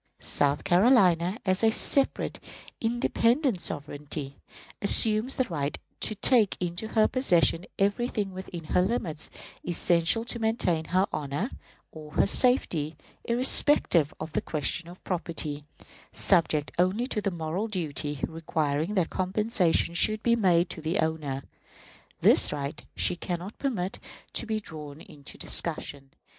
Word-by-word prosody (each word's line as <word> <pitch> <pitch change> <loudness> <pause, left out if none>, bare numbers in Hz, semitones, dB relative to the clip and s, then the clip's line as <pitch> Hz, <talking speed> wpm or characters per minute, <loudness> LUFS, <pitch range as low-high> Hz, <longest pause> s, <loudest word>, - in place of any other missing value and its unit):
South 145 0 +1
Carolina, 185 -2 +4
as 185 +2 +1
a 225 - +6
separate, 270 +4 +1 0.4
independent 235 - +1
sovereignty, 145 -1 -5 0.5
assumes 215 +4 +4
the 260 - +2
right 150 - -3 0.2
to 215 - +1
take 220 -2 +3
into 175 +4 -3
her 220 -1 +3
possession 180 -8 +2
everything 205 0 0
within 185 -2 -7
her 155 - +1
limits 180 -7 -2 0.3
essential 175 +5 +1
to 235 - -2
maintain 220 -8 +1
her 185 +4 +2
honor 150 - -3 0.4
or 155 -2 -11
her - - +3
safety, 165 - +2 0.3
irrespective 235 - +3
of 155 0 -7
the - - 0
question 165 +2 -3
of 180 - -14
property, 160 -5 -4 0.5
subject 160 -5 +2
only 190 +7 +2
to 230 -5 -3
the 200 - 0
moral 175 +4 -3
duty 150 - -4
requiring 160 +2 -2
that 180 -4 0
compensation 185 -3 +1
should 215 +5 +1
be 235 -1 +3
made 180 -5 +3
to 165 - -7
the 160 +5 -1
owner. 155 -4 -2 0.8
This - - +5
right 145 +1 -5
she - - +1
can 175 0 -4
not 185 +5 -10
permit 205 -9 -3 0.3
to - - -1
be 220 -1 -1
drawn 150 -6 -8
into 140 -1 -13
discussion. 145 -4 +1
180 Hz, 135 wpm, -27 LUFS, 155-215 Hz, 0.8 s, a